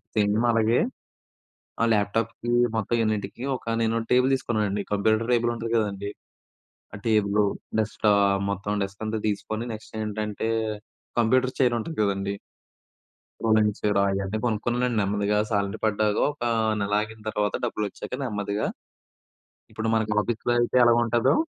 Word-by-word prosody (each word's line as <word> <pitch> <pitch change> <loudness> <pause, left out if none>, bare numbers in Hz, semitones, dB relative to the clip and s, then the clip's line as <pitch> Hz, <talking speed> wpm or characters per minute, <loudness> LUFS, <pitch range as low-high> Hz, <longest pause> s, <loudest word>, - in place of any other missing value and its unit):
Same 105 -1 +2 0.2
అలాగే 115 +1 +3 1.0
ఆ - - +5
ల్యాప్‌టాప్‌కి 115 +3 0 0.2
మొత్తం 110 +1 -1
యూనిట్‌కి 110 +1 -2
ఒక 115 -2 -3
నేను 115 0 +1
టేబుల్ 125 +2 +4
తీసుకున్నానండి. 105 -6 -1
కంప్యూటర్ 110 +2 +2
టేబుల్ 120 0 +2
ఉంటుంది 115 0 -4
కదండీ! 100 -2 -1 0.8
ఆ - - -6
టేబులు 105 -1 +3 0.3
డెస్క్‌టాప్ 100 -2 +2
మొత్తం 100 +1 -3
డెస్క్ 100 +2 -6
అంతా 110 0 -2
తీసుకొని 110 +2 -2
నెక్స్ట్ 110 0 -10
ఏంటంటే, 105 +1 -3 0.7
కంప్యూటర్ 130 +3 +2
చైర్ 125 -3 +3
ఉంటుంది 160 +8 -6
కదండీ! 100 0 -1 1.1
రోలింగ్ 110 -1 +3
చైరు 105 -1 +1
అయన్నీ 95 +1 -1
కొనుక్కున్నానండి. 120 +2 0
నెమ్మదిగా 100 +1 0
శాలరీ 100 -2 0
పడ్డాక, 105 0 +1 0.2
ఒక 145 - -29 0.4
నెల 100 0 -1
ఆగిన 110 +1 -7
తర్వాత 105 -1 -1
డబ్బులు 105 -2 -2
వచ్చాక - - -9
నెమ్మదిగా, 105 -2 -2 1.1
ఇప్పుడు 110 0 -2
మనకి 110 -1 0
ఆఫీస్‌లో 120 +2 -1
అయితే 120 +1 +1
ఎలాగుంటదో 120 0 +3
110 Hz, 130 wpm, -25 LUFS, 100-115 Hz, 1.1 s, ఆ